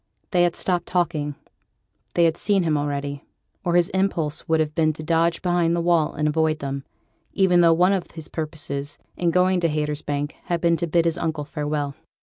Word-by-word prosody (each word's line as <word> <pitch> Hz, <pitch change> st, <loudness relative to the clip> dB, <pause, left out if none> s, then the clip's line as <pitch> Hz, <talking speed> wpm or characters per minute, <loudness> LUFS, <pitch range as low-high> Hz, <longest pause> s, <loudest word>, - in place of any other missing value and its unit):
They 180 Hz, -3 st, +3 dB
had 175 Hz, -, 0 dB
stopped 175 Hz, -2 st, -1 dB
talking; 155 Hz, -5 st, -1 dB, 0.8 s
they 170 Hz, -, +4 dB
had 165 Hz, -1 st, +3 dB
seen 200 Hz, -1 st, +1 dB
him 160 Hz, -2 st, +1 dB
already, 145 Hz, -1 st, -3 dB, 0.4 s
or 175 Hz, -2 st, 0 dB
his 175 Hz, -1 st, +4 dB
impulse 180 Hz, -6 st, -1 dB
would 160 Hz, 0 st, +3 dB
have 155 Hz, -1 st, 0 dB
been 155 Hz, -1 st, +2 dB
to 155 Hz, -, -7 dB
dodge 165 Hz, +2 st, +1 dB
behind 175 Hz, -2 st, +2 dB
the -, -, 0 dB
wall 170 Hz, -2 st, +2 dB
and 150 Hz, +1 st, 0 dB
avoid 155 Hz, 0 st, +1 dB
them; 140 Hz, -2 st, -4 dB, 0.5 s
even 180 Hz, -3 st, +4 dB
though 165 Hz, -1 st, +6 dB
one 180 Hz, +4 st, +4 dB
of 190 Hz, -3 st, -2 dB
his 160 Hz, -2 st, -6 dB
purposes 145 Hz, -2 st, -4 dB, 0.2 s
in 175 Hz, -, +1 dB
going 180 Hz, +1 st, +3 dB
to 170 Hz, -1 st, +1 dB
Haytersbank 150 Hz, -1 st, -2 dB
had 175 Hz, -1 st, -1 dB
been 170 Hz, 0 st, +3 dB
to 170 Hz, -, -2 dB
bid 170 Hz, +1 st, +2 dB
his 165 Hz, 0 st, 0 dB
uncle 160 Hz, -3 st, -2 dB
farewell. 150 Hz, -2 st, -3 dB
165 Hz, 195 wpm, -23 LUFS, 150-175 Hz, 0.8 s, though